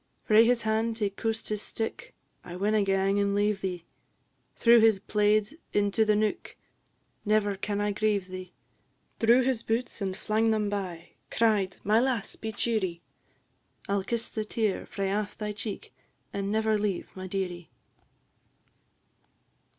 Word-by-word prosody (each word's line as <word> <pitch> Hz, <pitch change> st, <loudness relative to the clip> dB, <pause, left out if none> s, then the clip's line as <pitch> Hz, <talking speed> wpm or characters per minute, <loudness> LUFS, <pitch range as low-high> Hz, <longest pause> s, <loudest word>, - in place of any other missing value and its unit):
Frae 215 Hz, +1 st, +6 dB
his 240 Hz, 0 st, +2 dB
hand 220 Hz, +1 st, 0 dB
he 205 Hz, -3 st, 0 dB
coost 225 Hz, +2 st, -3 dB
his 210 Hz, -1 st, -2 dB
stick; 225 Hz, -, -4 dB, 0.3 s
"I 175 Hz, -, -8 dB
winna 210 Hz, +3 st, +2 dB
gang 195 Hz, 0 st, +2 dB
and 200 Hz, 0 st, +1 dB
leave 205 Hz, -1 st, +1 dB
thee;" 180 Hz, -3 st, -4 dB, 0.7 s
Threw 235 Hz, 0 st, +6 dB
his 220 Hz, -2 st, +5 dB
plaid 210 Hz, +1 st, +2 dB, 0.2 s
into 205 Hz, +2 st, +2 dB
the 215 Hz, -1 st, +3 dB
neuk; 215 Hz, 0 st, -1 dB, 0.7 s
"Never 210 Hz, -1 st, +2 dB
can 200 Hz, +1 st, -3 dB
I 205 Hz, 0 st, +1 dB
grieve 205 Hz, -2 st, 0 dB
thee;" 185 Hz, -1 st, -8 dB, 0.7 s
Drew 235 Hz, +3 st, +5 dB
his 255 Hz, -3 st, 0 dB
boots, 230 Hz, 0 st, -2 dB
and 190 Hz, -1 st, -2 dB
flang 220 Hz, +1 st, +1 dB
them 215 Hz, -2 st, +1 dB
by; 180 Hz, -4 st, -4 dB, 0.2 s
cried, 210 Hz, -5 st, +1 dB
"My 215 Hz, +2 st, +4 dB
lass, 245 Hz, -4 st, -1 dB
be 220 Hz, -, -5 dB
cheerie; 200 Hz, -6 st, -1 dB, 0.9 s
I 200 Hz, -, -1 dB
'll 200 Hz, -1 st, +1 dB
kiss 235 Hz, +2 st, -2 dB
the 215 Hz, -, -2 dB
tear 215 Hz, -2 st, -1 dB
frae 195 Hz, -1 st, -2 dB
aff 205 Hz, 0 st, -2 dB
thy 210 Hz, -1 st, -3 dB
cheek, 210 Hz, 0 st, -6 dB, 0.4 s
and 200 Hz, 0 st, -2 dB
never 220 Hz, 0 st, +2 dB
leave 205 Hz, -4 st, -2 dB
my 185 Hz, 0 st, -6 dB
dearie." 180 Hz, -3 st, -4 dB
210 Hz, 150 wpm, -28 LUFS, 195-220 Hz, 0.9 s, Frae